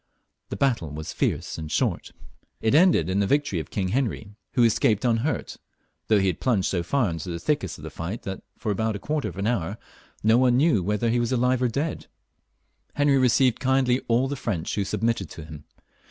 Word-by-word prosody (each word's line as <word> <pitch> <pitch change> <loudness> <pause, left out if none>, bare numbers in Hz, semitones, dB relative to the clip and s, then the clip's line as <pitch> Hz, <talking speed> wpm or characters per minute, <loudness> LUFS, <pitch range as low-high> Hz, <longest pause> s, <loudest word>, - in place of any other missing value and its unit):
The - - -4
battle 120 - 0
was 75 +2 -6
fierce - - -2
and 80 -1 -6
short. - - -1 0.5
It 110 - +1
ended 160 - +5
in 95 +2 0
the 100 - +2
victory 145 - +1
of 80 - -7
King 95 -3 -2
Heniy, 110 -3 -2 0.2
who 125 - +4
escaped 110 -1 +2
unhurt, 120 +2 0 0.5
though 110 - +4
he 95 - +1
had 90 -4 0
plunged 110 -8 +1
so 90 - 0
£eur 115 +2 0
into 80 +2 -5
the 85 - -3
thickest 150 - -1
of 75 - -13
the 80 - -7
fight 85 +9 -5
that, 95 -1 -5 0.2
for 105 - -2
about 110 +2 -1
a - - -5
quarter 150 +6 -2
of - - -11
an 100 - -2
hour, 105 -3 -1 0.5
no 110 +3 +5
one 125 -1 +4
knew 130 - +2
if 105 - -1
he 115 +1 +2
were 120 - +1
alive 125 0 +2
or 125 - +3
dead. 145 +7 -3 0.9
Henry 145 -2 +3
received 125 -1 +3
kindly 130 -1 +2
all 120 +3 +2
t^e 145 - -3
French 95 -10 -3
who 100 - 0
submitted 105 -1 -1
to 80 - -9
him. 75 -2 -11
115 Hz, 210 wpm, -25 LUFS, 95-130 Hz, 0.9 s, ended